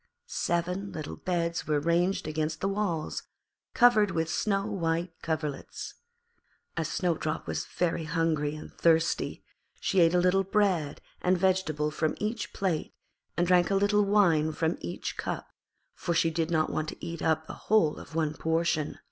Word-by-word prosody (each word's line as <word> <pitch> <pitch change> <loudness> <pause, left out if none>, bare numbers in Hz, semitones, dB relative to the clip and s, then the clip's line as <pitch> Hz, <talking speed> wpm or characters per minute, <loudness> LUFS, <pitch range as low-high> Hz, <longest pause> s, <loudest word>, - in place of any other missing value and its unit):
Seven 180 +3 -1
little 155 -2 -5
beds 170 -2 -1
were 150 -1 +2
ranged 170 +4 +1
against 155 0 -2
the 195 - 0
walls, 195 -6 -1 0.5
covered 240 -4 +6
with 160 -2 -1
snow 195 -2 0
white 170 -1 -1
coverlets. 155 -3 -4 0.8
As - - -1
Snowdrop 165 -3 -1
was - - -3
very 170 -2 -1
hungry 155 -2 0
and 155 - -10
thirsty 165 0 +1 0.4
she 195 - +1
ate 170 0 +5
a - - +5
little 185 +2 +3
bread 190 -7 +1 0.2
and 180 +1 +3
vegetable 175 -5 +1
from 155 +1 0
each 215 +1 -3
plate, 180 -6 -2 0.4
and 175 - +3
drank 180 -1 +4
a 200 - +2
little 205 +1 +3
wine 175 -7 +3
from 160 +2 -1
each 85 - -5
cup, - - -4 0.4
for 170 - -2
she 165 0 +3
did 160 0 -1
not 160 -2 +1
want 155 0 -2
to - - -8
eat 170 -1 -5
up 160 0 +1
the - - -7 0.2
whole 210 -9 +4
of 160 - -11
one 155 -2 +1
portion. 160 -1 0
170 Hz, 160 wpm, -29 LUFS, 155-190 Hz, 0.8 s, covered